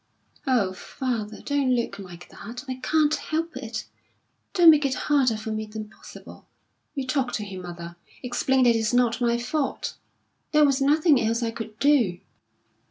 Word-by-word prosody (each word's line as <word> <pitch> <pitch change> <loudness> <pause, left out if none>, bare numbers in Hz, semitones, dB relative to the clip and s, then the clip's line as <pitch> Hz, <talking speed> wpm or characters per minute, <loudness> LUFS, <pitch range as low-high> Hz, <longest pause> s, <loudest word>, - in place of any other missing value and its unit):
"Oh, 220 -8 +2
father, 220 0 -4
don't 280 -3 +2
look 230 -4 -2
like 180 -2 -10
that! 245 +5 -9
I 255 -1 -4
can't 305 +2 +2
help 325 +1 -2
it! 230 -4 -5 0.7
Don't 340 -3 +9
make 300 -1 +3
it 270 -2 0
harder 260 -6 +2
for 220 +1 -5
me 215 0 -3
than 215 0 -7
possible. - - -13 0.5
You 275 -2 -2
talk 255 -2 -1
to 215 - -2
him, 190 -2 -7
mother. 170 -1 -8 0.3
Explain 255 +1 +1
that 240 -2 +5
it's 225 +1 0
not 245 0 +2
my 235 -1 +2
fault. 270 +4 -2 0.6
There 300 0 +6
was 275 -1 +2
nothing 295 -1 +4
else 230 +2 0
I 230 - -1
could 225 -2 -8
do." 250 -11 +3
245 Hz, 165 wpm, -25 LUFS, 215-275 Hz, 0.7 s, Don't